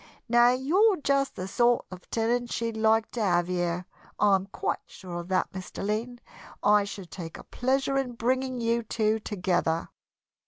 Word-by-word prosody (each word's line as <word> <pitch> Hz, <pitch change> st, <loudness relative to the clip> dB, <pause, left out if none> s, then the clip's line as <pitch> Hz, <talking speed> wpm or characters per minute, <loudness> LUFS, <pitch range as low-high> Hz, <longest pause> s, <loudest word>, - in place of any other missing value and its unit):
Now 240 Hz, 0 st, +6 dB
you're 355 Hz, -, +3 dB
just 275 Hz, -1 st, +1 dB
the 185 Hz, -, -4 dB
sort 240 Hz, +4 st, +2 dB
of 185 Hz, -1 st, -11 dB
tenant 235 Hz, +1 st, 0 dB
she'd 230 Hz, -1 st, -2 dB
like 220 Hz, 0 st, +2 dB
to 235 Hz, -, -3 dB
have 175 Hz, -4 st, +2 dB
here. 175 Hz, 0 st, -1 dB, 0.3 s
I'm 195 Hz, -2 st, +3 dB
quite -, -, -2 dB
sure 175 Hz, -2 st, -7 dB
of 170 Hz, -, -7 dB
that, 185 Hz, 0 st, 0 dB
Mr. 190 Hz, +1 st, -6 dB
Lynn. 230 Hz, +4 st, -2 dB, 0.4 s
I 210 Hz, -1 st, +5 dB
should 195 Hz, -3 st, -8 dB
take 165 Hz, -3 st, -7 dB
a -, -, -11 dB
pleasure 270 Hz, +2 st, 0 dB
in 255 Hz, -2 st, -3 dB
bringing 255 Hz, +2 st, -1 dB
you 235 Hz, 0 st, +1 dB
two 220 Hz, -1 st, 0 dB
together." 180 Hz, -5 st, -1 dB
220 Hz, 165 wpm, -27 LUFS, 185-245 Hz, 0.4 s, Now